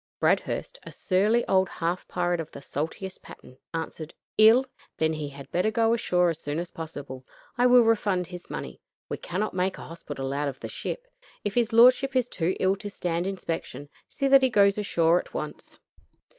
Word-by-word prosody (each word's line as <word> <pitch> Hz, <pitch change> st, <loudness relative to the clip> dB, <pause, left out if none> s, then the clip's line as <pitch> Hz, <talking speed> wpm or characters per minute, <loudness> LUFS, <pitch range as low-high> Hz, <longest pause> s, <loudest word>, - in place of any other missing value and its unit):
Bradhurst, -, -, 0 dB
a -, -, -10 dB
surly 210 Hz, +6 st, +1 dB
old 190 Hz, -1 st, +3 dB
half 170 Hz, +2 st, -3 dB
pirate 175 Hz, -1 st, -1 dB
of 165 Hz, -1 st, -5 dB
the -, -, -10 dB
saltiest 165 Hz, +7 st, -5 dB
pattern, 130 Hz, +1 st, -14 dB
answered: 160 Hz, -1 st, -5 dB, 0.2 s
"Ill? 225 Hz, +5 st, +6 dB, 0.3 s
Then 160 Hz, 0 st, +1 dB
he 150 Hz, -2 st, -4 dB
had 140 Hz, -1 st, -11 dB
better 180 Hz, +5 st, +1 dB
go 225 Hz, +1 st, +2 dB
ashore 180 Hz, -6 st, +2 dB
as 165 Hz, -, -6 dB
soon 145 Hz, -1 st, -4 dB
as 170 Hz, +1 st, -4 dB
possible. 145 Hz, -5 st, -8 dB, 0.3 s
I 250 Hz, 0 st, +4 dB
will 250 Hz, -1 st, +7 dB
refund 205 Hz, -5 st, +1 dB
his 180 Hz, +1 st, -10 dB
money. -, -, -6 dB, 0.3 s
We -, -, -3 dB
cannot 195 Hz, +5 st, -3 dB
make 185 Hz, +1 st, -1 dB
a -, -, -8 dB
hospital 145 Hz, -5 st, -6 dB
out 145 Hz, +1 st, -1 dB
of 135 Hz, -2 st, -5 dB
the -, -, -6 dB
ship. -, -, -5 dB, 0.4 s
If 205 Hz, -, -2 dB
his 235 Hz, 0 st, +1 dB
lordship 255 Hz, +3 st, +5 dB
is 250 Hz, -2 st, +2 dB
too 180 Hz, -4 st, -1 dB
ill 190 Hz, +1 st, +2 dB
to 205 Hz, +1 st, -6 dB
stand 175 Hz, -2 st, -2 dB
inspection, 165 Hz, -7 st, -5 dB, 0.2 s
see 275 Hz, -, -2 dB
that 275 Hz, 0 st, +7 dB
he 260 Hz, -, +3 dB
goes 200 Hz, -3 st, +4 dB
ashore 170 Hz, -4 st, +3 dB
at -, -, -10 dB
once." -, -, -6 dB
180 Hz, 190 wpm, -26 LUFS, 165-220 Hz, 0.4 s, will